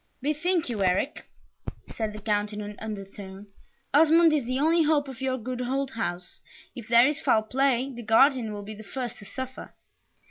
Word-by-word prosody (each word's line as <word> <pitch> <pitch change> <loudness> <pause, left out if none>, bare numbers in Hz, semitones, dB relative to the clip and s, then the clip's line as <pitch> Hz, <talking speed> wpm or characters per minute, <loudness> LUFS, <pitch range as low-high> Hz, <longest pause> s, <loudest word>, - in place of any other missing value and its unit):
"Bethink 315 +5 0
you, 220 -5 -2
Eric," 185 +10 0 0.7
said 220 -2 -3
the 210 - -9
Count, 210 0 -1
in 210 - -5
an 210 0 -7
undertone, 195 -2 -8 0.5
"Osmond 325 +2 +6
is 290 -5 +1
the 255 +2 -1
only 325 +3 +3
hope 300 -2 +2
of 265 -1 -9
your 260 -1 0
good 250 +1 -5
old 265 +2 -2
house 180 -6 -5 0.3
if 235 -5 -9
there 235 +1 +6
is 295 +1 0
foul 220 - +3
play, 265 +2 +1
the 240 - -8
guardian 235 +1 +3
will 205 -1 -6
be 215 +2 -8
the 215 +1 -11
first 245 +2 -5
to 205 - -11
suffer." 260 +5 -7
245 Hz, 185 wpm, -26 LUFS, 210-275 Hz, 0.7 s, Osmond